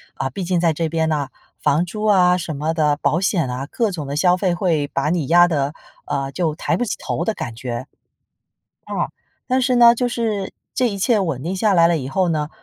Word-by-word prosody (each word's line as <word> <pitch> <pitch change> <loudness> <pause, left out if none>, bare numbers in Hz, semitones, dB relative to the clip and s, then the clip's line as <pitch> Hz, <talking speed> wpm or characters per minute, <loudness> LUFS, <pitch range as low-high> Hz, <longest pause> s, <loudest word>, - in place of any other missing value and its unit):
啊， 135 - -2
毕 185 +9 -5
竟 180 0 +1
在 165 -1 +2
这 160 +1 -2
边 160 0 0
呐， 145 -3 -1 0.3
房 155 +5 +2
租 210 +4 -6
啊 180 -4 +5
什 170 -3 -4
么 155 +3 -1
的， 150 -3 +1
保 155 +2 +1
险 180 -7 +1
啊， 125 +2 -4
各 230 -3 0
种 160 -6 -5
的 140 - -4
消 180 +3 +4
费 185 -2 +1
会 165 -5 0
把 140 +1 -1
你 165 -4 -1
压 175 +2 +6
得， 145 -3 -1 0.3
呃， 135 0 -2
就 165 -2 0
抬 165 - -1
不 245 - 0
起 - - -2
头 - - -2
的 220 - 0
感 120 - -6
觉。 120 +1 -5 1.0
啊， - - -2 0.4
但 260 0 +2
是 255 0 +2
呢 235 -1 +8
就 245 +1 0
是， 220 -5 -2 0.2
这 255 - +2
一 200 - -5
切 215 +3 +2
稳 160 -9 -2
定 180 +4 -2
下 205 +2 +2
来 170 -2 +5
了 170 -1 +2
以 130 -4 -5
后 185 +5 0
呢， 155 -2 -1
170 Hz, 245 characters per minute, -20 LUFS, 150-195 Hz, 1.0 s, 呢